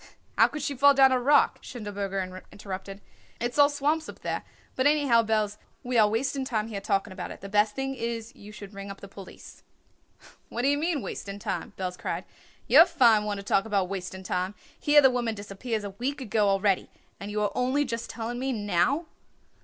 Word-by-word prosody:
"How -, -, +6 dB
could 300 Hz, -, -6 dB
she 285 Hz, -, -1 dB
fall 280 Hz, +2 st, +5 dB
down 270 Hz, -1 st, +6 dB
a 255 Hz, -, +3 dB
rock?" 285 Hz, +3 st, +4 dB
Schindelberger 195 Hz, -5 st, -5 dB
interrupted. 195 Hz, 0 st, -7 dB, 0.4 s
"It's 240 Hz, +4 st, -2 dB
all 285 Hz, 0 st, +7 dB
swamps 295 Hz, +2 st, 0 dB
up -, -, -11 dB
there. -, -, -2 dB, 0.3 s
But, 260 Hz, +2 st, +3 dB
anyhow, 285 Hz, -6 st, +4 dB
Belz, 215 Hz, -2 st, 0 dB, 0.3 s
we 250 Hz, 0 st, -3 dB
are 215 Hz, -2 st, +6 dB
wasting 265 Hz, +5 st, -1 dB
time 225 Hz, -4 st, -2 dB
here 200 Hz, -3 st, -5 dB
talking 195 Hz, 0 st, -1 dB
about 185 Hz, -2 st, -6 dB
it. -, -, -10 dB
The 195 Hz, -, -8 dB
best 210 Hz, +1 st, +2 dB
thing 270 Hz, 0 st, -2 dB
is 230 Hz, -2 st, -4 dB
you 205 Hz, +1 st, -12 dB
should 205 Hz, -1 st, -10 dB
ring 200 Hz, 0 st, -8 dB
up 195 Hz, -, -8 dB
the 200 Hz, -, -10 dB
police." 195 Hz, -1 st, -12 dB, 0.9 s
"What 240 Hz, -, -3 dB
d'ye 280 Hz, +2 st, +3 dB
mean, 305 Hz, -2 st, -1 dB
wasting 200 Hz, 0 st, -6 dB
time?" 205 Hz, -, -4 dB
Belz 180 Hz, -1 st, -4 dB
cried. -, -, -3 dB, 0.4 s
"You're -, -, +8 dB
a -, -, +9 dB
fine 235 Hz, -10 st, +4 dB
one 205 Hz, -1 st, -2 dB
to 200 Hz, -, -7 dB
talk 195 Hz, 0 st, +2 dB
about 200 Hz, -4 st, 0 dB
wasting 190 Hz, -1 st, -5 dB
time. 185 Hz, +2 st, -2 dB, 0.2 s
Here 295 Hz, 0 st, +6 dB
the 265 Hz, -2 st, +6 dB
woman 240 Hz, -3 st, -1 dB
disappears 205 Hz, +2 st, -4 dB
a 200 Hz, -, -5 dB
week 260 Hz, +8 st, -3 dB
ago 215 Hz, -4 st, +1 dB
already 195 Hz, -1 st, +1 dB, 0.3 s
and 200 Hz, -, -6 dB
you 210 Hz, 0 st, -2 dB
are 205 Hz, -, 0 dB
only 260 Hz, +4 st, +1 dB
just 230 Hz, -2 st, -4 dB
telling 235 Hz, +1 st, -4 dB
me 265 Hz, +1 st, -1 dB
now." 210 Hz, -, +1 dB
220 Hz, 205 wpm, -27 LUFS, 200-265 Hz, 0.9 s, a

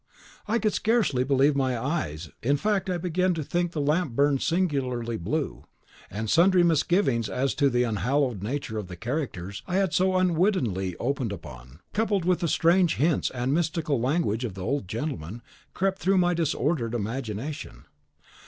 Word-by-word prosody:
I 225 Hz, +3 st, +2 dB
could 215 Hz, -1 st, 0 dB
scarcely 215 Hz, -, +2 dB
believe 140 Hz, +2 st, +3 dB
my 130 Hz, -3 st, +1 dB
eyes: 90 Hz, -, -3 dB
in 140 Hz, +5 st, +2 dB
fact, 200 Hz, +2 st, 0 dB
I 180 Hz, -, 0 dB
began 180 Hz, +1 st, 0 dB
to 160 Hz, -, -3 dB
think 175 Hz, +3 st, -1 dB
the 160 Hz, -, -4 dB
lamp 150 Hz, -1 st, +1 dB
burned 140 Hz, 0 st, +3 dB
singularly 135 Hz, -9 st, 0 dB
blue; 135 Hz, -, -3 dB, 0.4 s
and 110 Hz, +3 st, -4 dB
sundry 175 Hz, -, +5 dB
misgivings 160 Hz, -, +2 dB
as 135 Hz, +1 st, 0 dB
to 140 Hz, -2 st, +2 dB
the 125 Hz, -1 st, +2 dB
unhallowed 120 Hz, -, 0 dB
nature 110 Hz, 0 st, -3 dB
of 100 Hz, -, -6 dB
the 90 Hz, -, -8 dB
characters 110 Hz, -, -4 dB
I 180 Hz, -, -2 dB
had 190 Hz, -4 st, +1 dB
so 185 Hz, +2 st, +2 dB
unwittingly 165 Hz, -, +1 dB
opened 130 Hz, -3 st, -1 dB
upon, 65 Hz, -5 st, -10 dB
coupled 205 Hz, -4 st, 0 dB
with 180 Hz, -1 st, +2 dB
the 175 Hz, -, 0 dB
strange 170 Hz, +2 st, +3 dB
hints 155 Hz, +1 st, +1 dB
and 125 Hz, +2 st, -1 dB
mystical 155 Hz, -4 st, 0 dB
language 130 Hz, -4 st, 0 dB
of 110 Hz, -6 st, -4 dB
the 95 Hz, -, -6 dB
old 140 Hz, -1 st, -1 dB
gentleman, 115 Hz, -, -5 dB, 0.3 s
crept 190 Hz, +1 st, 0 dB
through 190 Hz, +1 st, +2 dB
my 175 Hz, -1 st, +3 dB
disordered 150 Hz, -7 st, 0 dB
imagination. 120 Hz, +5 st, -5 dB
140 Hz, 165 wpm, -26 LUFS, 115-175 Hz, 0.4 s, sundry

